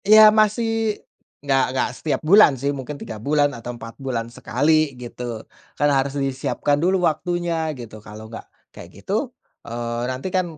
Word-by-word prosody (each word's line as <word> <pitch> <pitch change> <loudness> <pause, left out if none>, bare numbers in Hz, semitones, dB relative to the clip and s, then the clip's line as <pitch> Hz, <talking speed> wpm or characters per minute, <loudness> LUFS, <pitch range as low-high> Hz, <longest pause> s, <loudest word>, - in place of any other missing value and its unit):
Ya 215 +1 +8
masih 220 0 +1 0.5
enggak 135 -1 +3
enggak 130 - 0
setiap 150 +3 -2
bulan 175 -5 +6
sih 140 +3 -1
mungkin 140 +1 -6
3 110 -5 -8
bulan 145 +2 +2
atau 120 0 -7
4 115 0 -9
bulan 120 -3 -3
sekali 145 +4 +1
gitu, 120 -2 -7 0.3
kan 145 - +3
harus 135 +1 0
disiapkan 140 +1 -1
dulu 180 +1 +2
waktunya 170 0 -1
gitu. 110 -3 -10
Kalau 105 +1 -10
enggak 115 - -10 0.2
kayak - - -11
gitu, - - -2 0.3
eee, 120 0 -4
nantikan 170 +5 -2
140 Hz, 155 wpm, -22 LUFS, 120-175 Hz, 0.5 s, Ya